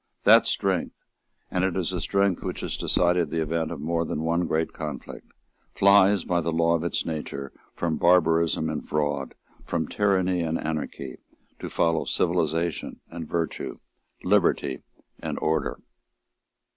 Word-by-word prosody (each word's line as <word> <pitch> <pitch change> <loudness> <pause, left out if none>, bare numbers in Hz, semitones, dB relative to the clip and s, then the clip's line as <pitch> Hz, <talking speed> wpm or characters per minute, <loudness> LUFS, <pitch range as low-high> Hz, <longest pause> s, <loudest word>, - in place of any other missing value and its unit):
That - - +7
strength, - - -1 0.5
and 90 - 0
it 95 -2 0
is 95 0 -1
a 90 - -2
strength 100 -2 +1
which - - -4
has - - -3
decided 90 -2 +2
the 80 - -2
event 80 0 -1
of - - -6
more 85 +3 0
than 80 -1 -3
one 85 +1 +1
great 80 +1 0
conflict, 75 -3 -7 0.4
flies, 100 -1 +5
by 90 -1 0
the 85 - -1
law 85 +1 +2
of 85 -1 0
its 85 - -1
nature, 70 -4 -5 0.2
from 80 -2 -1
barbarism 85 -2 +3
and 80 -1 -3
fraud, 75 -2 -1 0.3
from 80 -3 -2
tyranny 95 -3 +1
and 80 0 -1
anarchy, 75 -4 -4 0.4
to - - -5
follow 85 -1 +1
civilisation 85 -1 0
and 80 -2 -7
virtue, 85 -3 -3 0.5
liberty 90 -8 +2 0.4
and - - -3
order. 80 +1 0
85 Hz, 145 wpm, -26 LUFS, 80-90 Hz, 0.5 s, That